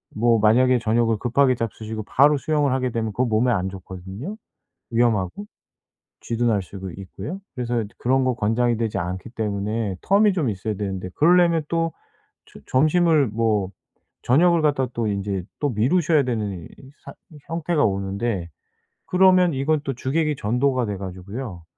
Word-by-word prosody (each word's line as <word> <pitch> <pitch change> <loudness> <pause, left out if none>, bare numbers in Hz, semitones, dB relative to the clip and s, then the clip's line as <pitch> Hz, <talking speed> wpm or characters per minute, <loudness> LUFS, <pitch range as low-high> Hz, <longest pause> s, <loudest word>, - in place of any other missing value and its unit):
뭐 115 +1 +3
만약에 125 +4 +4
저녁을 115 0 +1
급하게 130 +3 +2
잡수시고 110 -1 -5
바로 145 +7 +4
수영을 145 -1 0
하게 130 -2 0
되면 110 -2 -2
그건 125 +3 0
몸에 115 +3 +2
안 95 -4 0
좋거든요 95 - -8 0.6
위험하고. 115 - 0 0.8
쥐도 120 +1 -1
날 105 -4 +2
수도 95 0 -8
있고요. 120 - -7
그래서 120 -2 -2
인제 105 +2 -10
그런 130 +2 +2
거 130 -1 +1
권장이 120 +2 +1
되지 115 -1 -2
않기 90 +5 -4
때문에 105 -2 -2
텀이 205 +1 +4
좀 150 -10 0
있어야 105 +2 -3
되는데 95 -2 -4
그러려면 170 0 +4
또 165 -1 0 0.6
저 - - -12
점심을 155 +1 +3
뭐 105 -3 0 0.5
저녁을 170 +5 +4
갖다가 135 -4 +1
또 115 -2 -1
인제 100 -2 -2 0.2
또 145 -2 +1
미루셔야 145 - +2
되는 105 -8 -3
이 - - -11 0.4
사 - - -10 0.2
이 155 - -13
형태가 165 -1 0
오는데 100 -2 -2 0.6
그러면 185 -2 +4
이건 145 +3 +1
또 135 - -1
주객이 150 +4 -1
전도가 125 +3 +1
돼 100 -2 -4
가지고요. 95 +1 -7
120 Hz, 340 characters per minute, -23 LUFS, 105-145 Hz, 0.8 s, 만약에